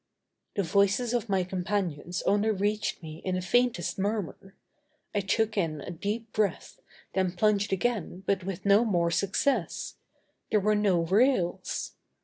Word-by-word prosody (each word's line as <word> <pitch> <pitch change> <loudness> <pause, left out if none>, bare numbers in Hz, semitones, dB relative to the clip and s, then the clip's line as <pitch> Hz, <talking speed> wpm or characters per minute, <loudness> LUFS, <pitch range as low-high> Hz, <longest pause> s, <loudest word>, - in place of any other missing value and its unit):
The 200 - +1
voices 200 +7 +2
of 235 -2 -1
my 190 -2 +2
companions 180 -3 -2
only 205 +2 +2
reached 210 -2 -1
me 155 0 -8
in 185 -1 -1
the 185 - -1
faintest 230 -3 +1
murmur. 195 -1 -3 0.6
I 205 - +1
took 215 +2 0
in 160 -4 -1
a - - -6
deep 210 +6 -4
breath, 215 -2 -1 0.3
then 185 -2 +1
plunged 205 +1 +2
again 195 -2 -1
but 195 -1 0
with 190 0 -5
no 200 +3 +6
more 175 -7 +1
success. 200 - 0 0.5
There 215 - +3
were 210 +2 +2
no 200 -5 +3
rails! 190 +1 +1
200 Hz, 145 wpm, -28 LUFS, 180-215 Hz, 0.6 s, no